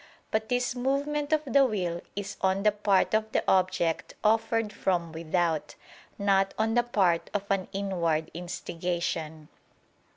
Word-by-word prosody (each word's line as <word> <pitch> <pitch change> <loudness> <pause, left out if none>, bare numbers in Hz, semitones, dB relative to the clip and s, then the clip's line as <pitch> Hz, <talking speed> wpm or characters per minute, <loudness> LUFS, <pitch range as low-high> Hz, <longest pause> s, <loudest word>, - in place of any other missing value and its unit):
But 220 0 -1
this 245 0 +1
movement 285 +4 -1
of 310 -1 +3
the 275 +1 +4
will 180 -8 -1
is 200 0 -4
on 190 +1 +1
the 210 - +5
part 205 -1 +2
of 220 0 +1
the - - +2
object 180 -3 +1
offered 225 0 +2
from 175 -4 -1
without: 165 0 -1 0.4
not 195 -1 +2
on 220 +1 +1
the 240 - +4
part 190 -8 +1
of 200 - 0
an 195 -2 +1
inward 170 -5 -1
instigation. 170 -2 -4
195 Hz, 140 wpm, -28 LUFS, 175-220 Hz, 0.4 s, the